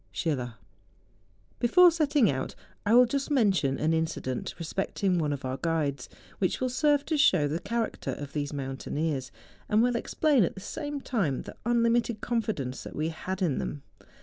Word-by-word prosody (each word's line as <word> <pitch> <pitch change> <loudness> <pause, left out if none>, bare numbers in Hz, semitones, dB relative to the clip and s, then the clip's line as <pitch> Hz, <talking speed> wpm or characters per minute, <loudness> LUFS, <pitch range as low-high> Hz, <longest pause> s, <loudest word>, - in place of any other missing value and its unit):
Schiller. 125 -7 -2 1.0
Before 355 +9 +6
setting* 295 -6 +3
out, 130 -1 -4 0.3
I 225 - +5
will 250 +1 +8
just 275 +4 -2
mention 195 - +2
an 155 - +1
inci¬ 160 0 0
dent 130 -1 -4
respecting 180 +2 -1
one 150 -2 0
of 140 -2 -4
our 130 +1 -2
guides, 150 -6 -1 0.3
which 185 - 0
will 255 - 0
serve 290 +2 +2
to 315 -2 0
show 150 - +5
the 155 +4 -2
character 225 +3 -2
of 145 -1 -7
tliese 145 -1 -2
mountaineers, 135 0 -3 0.4
and 215 +2 +4
will 245 0 +2
explain 285 0 +2
at - - -1
the - - -8
same 290 +7 -5
time 180 - -1
the - - -10
unlimited 235 -1 +2
confi¬ 230 -2 -1
dence 130 -2 -5
that - - -9
we 155 +2 -1
had 190 +4 -4
in 155 -7 +1
them. 145 -1 -4
190 Hz, 175 wpm, -28 LUFS, 145-240 Hz, 1.0 s, will